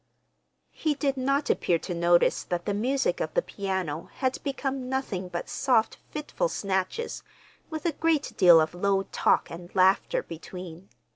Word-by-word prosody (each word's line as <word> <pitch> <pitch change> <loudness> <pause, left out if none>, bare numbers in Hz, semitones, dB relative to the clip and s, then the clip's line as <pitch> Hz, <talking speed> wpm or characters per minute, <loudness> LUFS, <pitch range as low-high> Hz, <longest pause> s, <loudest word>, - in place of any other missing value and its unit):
He 310 -2 -1
did 275 -1 0
not 275 +2 +1
appear 170 - +1
to 180 - -5
notice 170 0 +3
that 175 -1 -3
the 205 - 0
music 270 - 0
of - - -2
the - - +4
piano 190 -5 -3
had 260 -1 -1
become 270 -2 -3
nothing 210 -9 -2
but 175 -1 -4
soft 245 -5 +1
fitful 305 +11 -2
snatches 195 - -2 0.5
with 315 -1 -5
a 340 - +3
great 310 -1 0
deal 175 -4 +8
of 155 +1 +1
low 195 +2 +1
talk - - +2
and 175 +1 -8
laughter 190 +1 +3
between. 175 +2 -9
200 Hz, 155 wpm, -27 LUFS, 180-275 Hz, 0.5 s, deal